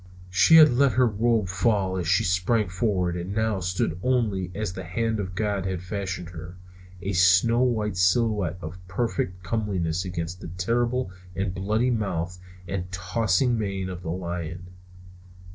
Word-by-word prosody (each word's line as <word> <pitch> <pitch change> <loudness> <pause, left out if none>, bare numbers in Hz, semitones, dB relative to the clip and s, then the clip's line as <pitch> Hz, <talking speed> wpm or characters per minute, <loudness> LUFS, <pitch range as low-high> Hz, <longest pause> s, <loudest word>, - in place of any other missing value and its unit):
She 90 - +6
had 155 -4 +8
let 135 +1 +3
her 130 0 +4
robe 110 -1 +1
fall 95 0 +1
as 90 -3 -2
she 95 +2 +3
sprang 95 +4 +1
forward 90 -1 0
and 90 +3 -4
now 110 -2 +1
stood 90 -2 -1
only 105 -7 0
as 105 -3 -3
the 95 - -6
hand 110 +5 -1
of 95 -2 -4
God 100 -2 -1
had 90 -2 -3
fashioned 90 -2 -4
her; 90 +1 -9 0.5
a 100 +2 -2
snow 95 +7 +4
white 110 -6 0
silhouette 95 -1 +2
of 85 +4 -7
perfect 90 -3 -2
comeliness 90 -4 -1
against 90 -1 -5
the - - -7
terrible 115 +6 -1 0.2
and 95 -1 -2
bloody 110 +6 0
mouth 90 -6 -2 0.3
and 90 0 -4
tossing 100 +6 +1
mane 95 -3 -2
of 90 -1 -6
the 85 - -6
lion. 85 0 -5
95 Hz, 160 wpm, -25 LUFS, 90-110 Hz, 0.5 s, had